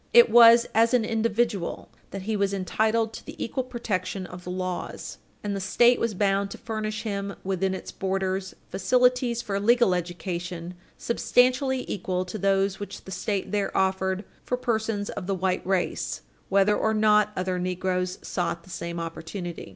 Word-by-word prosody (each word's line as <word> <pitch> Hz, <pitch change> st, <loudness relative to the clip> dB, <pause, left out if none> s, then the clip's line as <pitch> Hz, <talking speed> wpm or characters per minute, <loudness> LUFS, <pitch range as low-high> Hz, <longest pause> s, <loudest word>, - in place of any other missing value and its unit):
It 475 Hz, 0 st, +8 dB
was 235 Hz, 0 st, +8 dB
as 230 Hz, +2 st, +4 dB
an 230 Hz, -3 st, +2 dB
individual 225 Hz, -3 st, -1 dB, 0.2 s
that 195 Hz, 0 st, -6 dB
he 220 Hz, +2 st, -1 dB
was 200 Hz, -1 st, +1 dB
entitled 220 Hz, +4 st, 0 dB
to -, -, -8 dB
the -, -, -9 dB
equal 260 Hz, +3 st, -2 dB
protection 205 Hz, -6 st, -3 dB
of 180 Hz, 0 st, -10 dB
the 180 Hz, -, -7 dB
laws, 185 Hz, 0 st, -4 dB, 0.2 s
and 205 Hz, -1 st, -2 dB
the -, -, -2 dB
State 240 Hz, +6 st, +4 dB
was 230 Hz, -3 st, -1 dB
bound 200 Hz, 0 st, +1 dB
to -, -, -8 dB
furnish 215 Hz, -1 st, -4 dB
him 200 Hz, -2 st, -3 dB
within 190 Hz, 0 st, 0 dB
its -, -, -7 dB
borders 190 Hz, 0 st, -2 dB
facilities 250 Hz, +3 st, +2 dB
for 200 Hz, -4 st, -2 dB
legal 235 Hz, -1 st, +4 dB
education 175 Hz, 0 st, -4 dB, 0.2 s
substantially 255 Hz, +2 st, +2 dB
equal 185 Hz, -1 st, -2 dB
to 210 Hz, +4 st, -6 dB
those 195 Hz, 0 st, +1 dB
which 205 Hz, -, -7 dB
the 190 Hz, -, -10 dB
State 190 Hz, +1 st, -2 dB
there 205 Hz, -1 st, 0 dB
afforded 190 Hz, 0 st, +1 dB, 0.2 s
for 250 Hz, -, -1 dB
persons 220 Hz, -4 st, -1 dB
of 180 Hz, -, -6 dB
the 195 Hz, -, 0 dB
white 185 Hz, 0 st, 0 dB
race, 190 Hz, -2 st, -1 dB, 0.3 s
whether 200 Hz, +1 st, +4 dB
or 220 Hz, +1 st, +1 dB
not 210 Hz, -1 st, +4 dB
other 185 Hz, 0 st, -1 dB
negroes 180 Hz, 0 st, -1 dB
sought 175 Hz, -2 st, -2 dB
the 185 Hz, -, -14 dB
same 170 Hz, 0 st, -4 dB
opportunity. 165 Hz, +1 st, -6 dB
195 Hz, 165 wpm, -26 LUFS, 185-225 Hz, 0.3 s, It